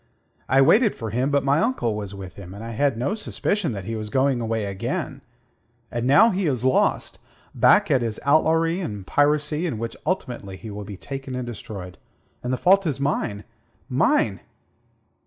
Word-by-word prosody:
I 135 +2 +5
waited 215 - +4
for 110 -2 -5
him; 125 +5 0
but 140 -2 +2
my 140 +2 +3
uncle 225 - 0
was 100 -2 -5
with 95 -2 -8
him, 95 -1 -10
and 105 - -8
I 115 - -6
had 135 +1 +1
no 130 - -1
suspicion 210 - -1
that 100 -2 -5
he 115 - -3
was 110 -1 -5
going 130 +1 +1
away 110 -2 -1
again. 95 -1 -4 0.7
And 120 +1 -2
now 210 - +6
he 190 -2 0
is 130 -4 -1
lost 130 - +1 0.3
back - - +4
at 130 - +4
his 115 -2 -2
outlawry 160 +3 +3
and 105 - -5
piracy, 150 - +1
in 125 - -3
which 115 +1 -4
ultimately 120 - -3
he 110 +1 -9
will 105 0 -6
be 100 -1 -8
taken 135 +3 -6
and 125 -1 -3
destroyed. 105 -6 -8 0.4
And 125 - -3
the 130 - 0
fault 195 +3 +4
is 140 -3 -2
mine 120 -7 -1 0.5
mine!" - - +2
125 Hz, 185 wpm, -23 LUFS, 105-150 Hz, 0.7 s, now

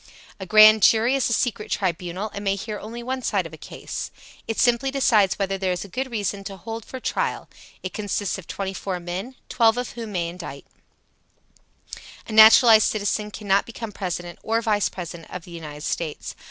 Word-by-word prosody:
A 190 - -7
grand 215 +1 +8
jury 225 +5 +5
is 275 -2 +1
a - - +1
secret 220 -3 -1
tribunal, 180 +2 -2
and 200 - -6
may 195 -1 +1
hear 210 +1 -5
only 230 +3 -8
one 260 +1 -3
side 200 -7 0
of 165 - -9
a - - -9
case. - - -7 0.4
It 225 - -3
simply 245 +2 +3
decides 230 -8 +3
whether 195 -1 -2
there 185 -1 0
is 180 +2 -5
good 260 +4 -3
reason 205 -3 -3
to 195 -1 -7
hold 225 +3 -7
for 260 - -8
trial. - - -2 0.4
It 185 - -5
consists 205 -2 -2
of 180 - -13
twenty 195 -1 -4
four 190 -1 -4
men, 180 +9 -6
twelve 230 -1 +3
of 250 - -3
whom 230 -3 -7
may 170 -2 -1
indict. 170 -5 -9 1.6
A - - -7
naturalized 220 +1 +8
citizen 210 0 -1
cannot 200 -2 0
become 230 -1 -7
President 175 -3 -5
or 225 +1 0
Vice 210 -2 +1
President 170 -2 -8
of 180 -2 -7
the 175 - -13
United 150 -3 -8
States. 165 -3 -4
205 Hz, 190 wpm, -23 LUFS, 185-225 Hz, 1.6 s, grand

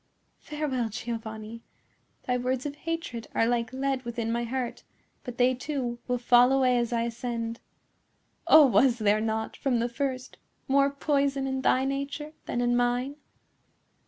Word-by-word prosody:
Farewell, 280 -6 -2
Giovanni! 220 0 -6 0.6
Thy 250 - 0
words 255 +1 -1
of 290 - -3
hatred 330 -7 -5
are 225 - +3
like 235 0 0
lead 265 0 -1
within 235 -1 -3
my 235 +1 -1
heart; 250 0 -3 0.4
but 245 -1 -7
they, 250 +1 +4
too, 250 -2 -3
will 250 -1 0
fall 245 +1 +5
away 255 -2 +3
as 235 0 -1
I 230 -1 +1
ascend. 230 0 -4 0.9
Oh, 310 - +9
was 255 -1 +4
there 215 -1 +2
not, 220 0 -2
from 260 -3 0
the 235 +1 0
first, 255 +1 -4 0.3
more 275 +1 +4
poison 280 -1 0
in 265 0 -2
thy 260 0 +3
nature 280 +2 -4
than 240 - -1
in 245 0 +2
mine?" 245 +3 0
250 Hz, 155 wpm, -27 LUFS, 235-270 Hz, 0.9 s, Oh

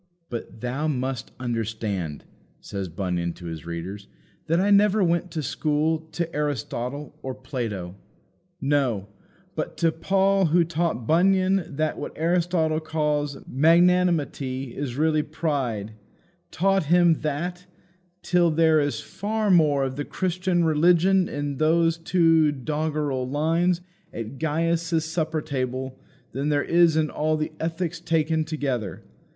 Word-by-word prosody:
But, 115 -1 -6
"thou 130 +5 -2
must 130 -4 -2
understand," 110 - -3 0.4
says 100 -2 -5
Bunyan 85 -1 -2
to 90 - -12
his 80 -1 -7
readers, 90 +4 -6 0.4
"that 165 +2 +2
I 200 +2 +2
never 205 0 +5
went 170 +1 +1
to 160 -2 -4
school 155 +2 0
to 170 -2 -3
Aristotle 145 -1 -3
or 130 -1 -5
Plato. 115 -9 -4 0.7
No; 135 - 0 0.4
but - - -4
to 165 -1 +3
Paul, 195 +3 +2
who 170 +2 +4
taught 165 -6 -1
Bunyan 185 +1 +2
that 155 +1 -1
what - - -5
Aristotle 165 -1 +1
calls 150 -3 -1
magnanimity 155 -5 +2
is 135 -4 -4
really 155 0 +2
pride 135 -9 -2 0.6
taught 195 0 +1
him 170 0 +4
that, 175 +5 -3 0.6
till 175 -1 +3
there 160 0 +4
is 145 -1 -1
far 215 0 -1
more 150 -6 +4
of 130 0 -3
the 145 - -1
Christian 180 +1 0
religion 175 +4 +4
in 145 -1 -3
those 165 +2 +2
two 165 -3 +3
doggerel 145 -2 -2
lines 165 +5 +1 0.3
at 115 +4 -7
Gaius's 165 +1 0
supper 160 -1 -2
table 130 -2 -3 0.3
than 140 +3 -2
there 145 -1 +2
is 170 -2 +4
in 155 -1 +1
all 155 +1 0
The 155 0 -2
Ethics 165 +1 -2
taken 160 -1 +1
together. 135 - -3
155 Hz, 130 wpm, -25 LUFS, 130-170 Hz, 0.7 s, never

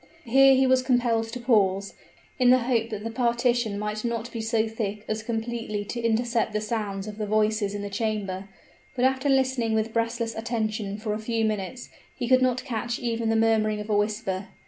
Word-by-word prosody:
Here 270 +3 +6
he 265 0 +4
was 260 0 +4
compelled 245 -3 +1
to 250 - -5
pause, 200 -5 +2 0.5
in 250 -1 +5
the 255 - +7
hope 235 -2 0
that 210 -2 -5
the 225 - -4
partition 240 -2 +1
might 210 +1 -3
not 235 0 -3
be 230 - -4
so 225 0 +1
thick 215 -2 -4
as 215 0 -2
completely 225 -2 -3
to 235 +3 -4
intercept 230 -1 +1
the 210 - +1
sounds 210 -3 -3
of 215 0 -8
the 210 - -2
voices 215 -1 +1
in 205 - -4
the 205 - -4
chamber; 200 -3 -3 0.5
but 250 0 +2
after 265 +2 +1
listening 260 -4 +2
with 220 +1 -1
breathless 230 0 -1
attention 220 -3 -2
for 215 -1 -3
a 210 - -3
few 225 0 -1
minutes, 215 +3 -3 0.3
he 245 -2 -3
could 255 +1 +5
not 255 -1 +1
catch 235 -2 -2
even 230 -2 -1
the 225 - +2
murmuring 220 -1 +2
of 210 +1 -5
a - - +3
whisper. 205 -2 -1
225 Hz, 200 wpm, -26 LUFS, 215-240 Hz, 0.5 s, the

